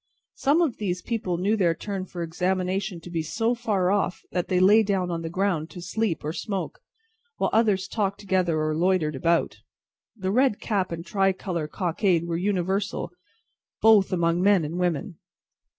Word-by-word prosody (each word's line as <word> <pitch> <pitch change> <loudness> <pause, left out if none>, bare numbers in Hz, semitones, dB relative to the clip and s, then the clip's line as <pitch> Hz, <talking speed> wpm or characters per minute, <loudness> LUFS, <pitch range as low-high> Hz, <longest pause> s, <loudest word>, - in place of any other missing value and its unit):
Some 295 +5 +2
of 285 -9 -1
these 180 -4 -3
people 200 -7 -2
knew 200 +5 +1
their 175 -6 +2
turn 195 +1 -4
for 175 -2 -6
examination 185 +2 -1
to 175 - -10
be 165 -2 -1
so 225 +9 0
far 200 -6 0
off, 200 -3 0
that 180 -1 -1
they 180 - +1
lay 205 +4 +6
down 195 -4 0
on 165 -1 -2
the 165 - -4
ground 175 -3 -1
to 180 - -10
sleep 205 -1 -1
or 155 - -2
smoke, 195 +1 -4 0.6
while - - 0
others 210 -4 +2
talked 200 -3 -2
together, 185 -5 0
or 155 0 0
loitered 170 -3 +1
about. 165 +5 +1 0.6
The 190 -2 -2
red 255 -1 +2
cap 195 -5 -1
and 165 0 -5
tri 195 -1 +2
colour 175 -4 -4
cockade 175 0 0
were 170 -1 -2
universal, 190 0 -1 0.7
both 215 -3 +5
among 170 -1 +1
men 195 -4 +4
and 165 +4 -4
women. 175 0 -2
185 Hz, 175 wpm, -25 LUFS, 170-205 Hz, 0.7 s, lay